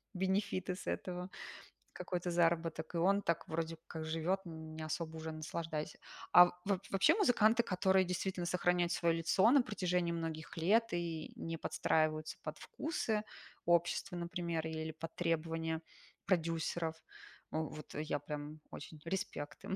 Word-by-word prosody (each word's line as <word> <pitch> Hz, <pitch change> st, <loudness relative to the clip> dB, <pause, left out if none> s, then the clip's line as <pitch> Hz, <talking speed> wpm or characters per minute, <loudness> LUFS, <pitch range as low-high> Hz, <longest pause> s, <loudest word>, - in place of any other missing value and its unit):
бенефиты 190 Hz, 0 st, 0 dB
с 185 Hz, -, -9 dB
этого, 180 Hz, 0 st, -3 dB, 0.6 s
какой-то 180 Hz, -1 st, -3 dB
заработок, 165 Hz, -1 st, +1 dB
и -, -, +2 dB
он 195 Hz, +4 st, +4 dB
так 170 Hz, 0 st, 0 dB
вроде 165 Hz, 0 st, -2 dB
как 160 Hz, 0 st, -5 dB
живет, 165 Hz, +4 st, 0 dB
не 160 Hz, -1 st, -7 dB
особо 160 Hz, +1 st, -3 dB
уже 160 Hz, 0 st, -4 dB
наслаждаясь. 155 Hz, 0 st, -4 dB, 0.4 s
А 180 Hz, 0 st, +11 dB
в -, -, -7 dB
вооб 195 Hz, -2 st, +1 dB
вообще 195 Hz, -, +5 dB
музыканты, 235 Hz, -, +4 dB
которые 190 Hz, -2 st, +3 dB
действительно 180 Hz, 0 st, -2 dB
сохраняют 175 Hz, -1 st, +2 dB
свое 170 Hz, -1 st, +2 dB
лицо 180 Hz, +6 st, +4 dB
на 275 Hz, -2 st, +6 dB
протяжении 180 Hz, -5 st, 0 dB
многих 165 Hz, -1 st, -4 dB
лет 220 Hz, +8 st, +3 dB
и 170 Hz, -2 st, -3 dB
не 165 Hz, 0 st, -4 dB
подстраиваются 155 Hz, 0 st, +1 dB
под -, -, -5 dB
вкусы 265 Hz, -, -1 dB, 0.4 s
общества, 175 Hz, +2 st, +2 dB
например, 170 Hz, -2 st, -2 dB
или 160 Hz, 0 st, -3 dB
под 160 Hz, +1 st, -8 dB
требования 165 Hz, -1 st, 0 dB, 0.4 s
продюсеров,- 165 Hz, -2 st, 0 dB, 0.6 s
у, 160 Hz, -, 0 dB
вот 155 Hz, -, -9 dB
я 150 Hz, -1 st, -1 dB
прям 150 Hz, +1 st, -6 dB
очень 155 Hz, +1 st, -8 dB
респект 165 Hz, -5 st, -4 dB
им, 190 Hz, -, -2 dB
170 Hz, 145 wpm, -36 LUFS, 160-185 Hz, 0.6 s, А